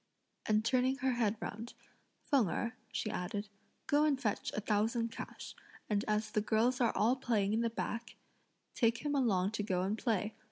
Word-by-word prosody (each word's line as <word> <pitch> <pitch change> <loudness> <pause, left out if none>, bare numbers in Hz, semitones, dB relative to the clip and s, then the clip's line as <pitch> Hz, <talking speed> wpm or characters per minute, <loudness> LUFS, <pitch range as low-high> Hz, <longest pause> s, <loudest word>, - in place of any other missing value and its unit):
and 215 0 +2
turning 255 +2 +3
her 265 -1 0
head 230 -3 +1
round, 225 +3 -6 0.5
"Feng 260 - +3
Erh," 235 +6 -1 0.2
she 215 - -2
added, 200 +3 -3 0.4
"go 290 +1 +3
and 290 -3 +2
fetch 210 -6 -1
a - - 0
thousand 225 +2 0
cash; - - -7 0.4
and 205 0 +2
as 215 0 0
the 210 - +1
girls 235 +4 +2
are 235 - +2
all 230 +4 +4
playing 215 -6 +1
at 225 - +2
the 230 - +1
back, 230 +1 -4 0.6
take 230 +3 +1
him 295 - +1
along 205 -9 +2
to 220 - -2
go 185 -3 0
and 205 +4 -1
play. 220 -3 0
225 Hz, 185 wpm, -34 LUFS, 210-245 Hz, 0.6 s, all